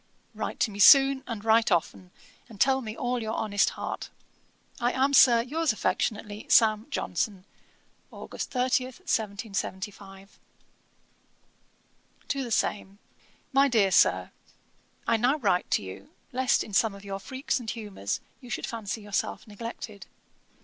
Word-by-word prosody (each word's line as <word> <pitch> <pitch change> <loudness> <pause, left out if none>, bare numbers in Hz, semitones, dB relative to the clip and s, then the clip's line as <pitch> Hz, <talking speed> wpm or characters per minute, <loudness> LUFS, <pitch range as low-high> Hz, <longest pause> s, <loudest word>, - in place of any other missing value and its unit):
'Write - - -5
to 220 - +1
me 200 - -9
soon, 270 +4 +7
and 225 -3 -6
write 225 -1 +4
often, 180 +1 -1 0.4
and 215 -4 -13
tell 265 0 +3
me 220 -2 -7
all 245 0 -1
your 220 0 -3
honest 205 -2 +1
heart. - - -5 0.7
'I 240 +1 +1
am 270 +2 +1
Sir, 235 -4 +7
'Yours 315 +4 0
affectionately, 210 -1 -2
'SAM. 215 -1 +4
JOHNSON.' 200 -8 -3 0.7
'Aug. - - -10
30, 255 0 0
1775.' 200 -4 -5 1.9
TO 275 -1 -1
THE 245 - -6
SAME. 200 -3 -1 0.6
'MY 275 +1 +5
DEAR 215 -7 +3
SIR, - - +3 0.7
'I 230 - +2
now 250 +6 +2
write 195 -10 0
to - - +1
you, 95 +1 -10 0.2
lest 255 0 +2
in 210 - -11
some 210 +1 +2
of 200 0 -13
your 195 -1 -5
freaks 260 +4 -3
and 230 -3 -7
humours 210 - -4 0.2
you 250 -2 -13
should 245 - -3
fancy 225 -1 -5
yourself 205 -1 -3
neglected. 215 -1 -8
220 Hz, 140 wpm, -27 LUFS, 200-250 Hz, 1.9 s, soon